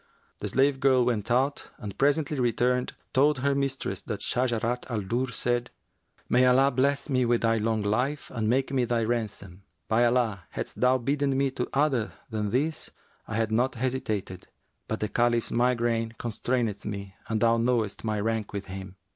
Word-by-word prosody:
The - - -3
slave 135 +1 +2
girl 130 -2 +4
went 110 -4 -1
out 130 +4 +1
and 105 -2 -7
presently 145 +3 +1
returning, 125 +1 +1 0.3
told 145 +2 +4
her 140 +2 +1
mistress 140 -1 -2
that 105 -4 -5
Shajarat 125 -1 -1
al 115 -4 -1
Durr 120 +6 -1
said, 120 0 -1 0.6
'May 125 +1 +4
Allah 135 +2 +5
bless 140 +3 +1
me 130 -3 +2
with 120 -1 +2
thy 115 0 +2
long 110 0 0
life 125 +8 -1
and 110 -3 -1
make 135 +3 +1
me 130 -2 +2
thy 120 -1 0
ransom! 105 -5 -3 0.3
By 115 +2 +3
Allah, 115 -7 +1
hadst - - -6
thou 125 +1 +5
bidden 140 +2 0
me 135 0 +1
to 125 -1 -3
other 135 -6 +1 0.2
than 105 -2 -1
this, 150 +8 -1 0.4
I 110 - -4
had 110 -1 0
not 125 +4 +1
hesitated; 110 -7 -3 0.4
but 110 - -3
the 105 - +1
Caliph's 120 +1 +1
migraine 115 -2 +1
constraineth 115 -2 -1
me 100 -2 -5
and 110 -1 0
thou 115 +1 +4
knowest 115 -3 0
my 110 -2 -1
rank 110 -1 -2
with 100 -1 -4
him.' 95 0 -8
120 Hz, 175 wpm, -27 LUFS, 110-130 Hz, 0.6 s, Allah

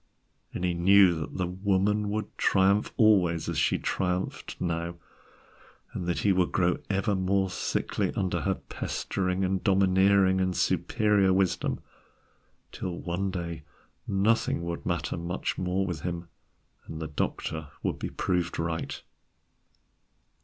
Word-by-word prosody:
And - - -5
he 90 - +1
knew 95 +1 +6
that 80 +2 -5
the 90 - 0
Woman 100 +3 +1
would 105 +1 -3
triumph 100 +2 +3
always 90 -7 +4
as - - -1
she - - +2
triumphed 90 0 -2
now, 85 0 -2 1.0
and 90 - -4
that 90 - 0
he 100 - +3
would 90 -2 +2
grow 90 -1 +2
ever 100 +2 +1
more 95 0 +1
sickly - - -1
under 95 -2 -1
her 95 -1 0
pestering 95 0 -2
and 95 0 -1
domineering 95 -1 +4
and 95 -1 0
superior 105 -3 +2
wisdom, 95 -1 +1 0.9
till 90 -2 -5
one 90 +3 -2
day 85 -3 -4 0.5
nothing 100 -3 +1
would 85 0 -4
matter 85 0 -1
much 85 +2 -3
more 95 +1 0
with 85 -6 -4
him, 85 0 -4 0.6
and 80 - -7
the 80 - -4
doctor 80 +1 -3 0.2
would - - -1
be - - -3
proved 90 -2 -1
right. 80 0 -3
95 Hz, 135 wpm, -28 LUFS, 85-95 Hz, 1.0 s, knew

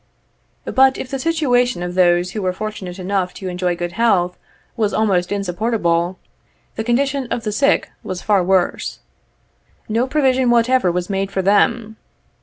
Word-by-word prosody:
But, 265 0 +3
if 255 - -7
the 270 - -3
situation 250 - +1
of 180 0 -4
those 180 0 +3
who 210 - -4
were 185 -1 -1
fortunate 195 -3 -6
enough 185 -1 -2
to 190 - -6
enjoy 180 0 -1
good 175 0 -4
health 180 -4 +1 0.4
was 215 -3 0
almost 190 -5 +1
insupportable, 185 -3 -1 0.6
the 220 - -3
condition 265 +3 0
of 235 - -2
the 215 - -2
sick 280 +7 +1
was 185 -1 -6
far 200 -3 +2
worse. 185 0 0 0.9
No 230 +4 0
provision 260 -3 +2
whatever 240 -4 +3
was 180 0 -2
made 195 0 -2
for 190 - -1
them. 220 +3 +2
205 Hz, 155 wpm, -19 LUFS, 180-240 Hz, 0.9 s, But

